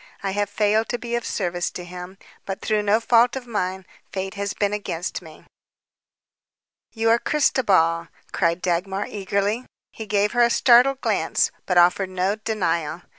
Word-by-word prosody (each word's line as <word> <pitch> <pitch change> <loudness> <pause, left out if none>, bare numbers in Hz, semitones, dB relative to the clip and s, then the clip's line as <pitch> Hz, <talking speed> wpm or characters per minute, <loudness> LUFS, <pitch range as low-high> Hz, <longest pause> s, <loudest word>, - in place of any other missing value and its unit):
I 195 - -1
have 205 +1 -1
failed 210 +2 +1
to 245 - -1
be 235 0 -6
of 235 0 -1
service 175 0 -2
to 180 - -8
him, 180 +2 -9 0.3
but 195 0 -4
through 215 -1 0
no 210 +1 +2
fault 235 +1 +3
of 260 -2 -5
mine. 190 -5 -3 0.3
Fate 190 0 -4
has 200 0 -4
been 205 0 0
against 180 -5 -4
me." 160 -3 -15 1.5
"You 225 0 +1
are 230 - +4
Christobal," 185 - +2 0.2
cried 170 -1 0
Dagmar 190 +3 -1
eagerly. 200 +3 -2 0.3
He 220 - -8
gave 205 +1 +1
her 245 - +2
a 235 - +5
startled 250 +3 +5
glance, - - +1 0.2
but 180 - +1
offered 180 +2 +4
no 185 +2 0
denial. 175 -7 -2
200 Hz, 165 wpm, -23 LUFS, 180-225 Hz, 1.5 s, a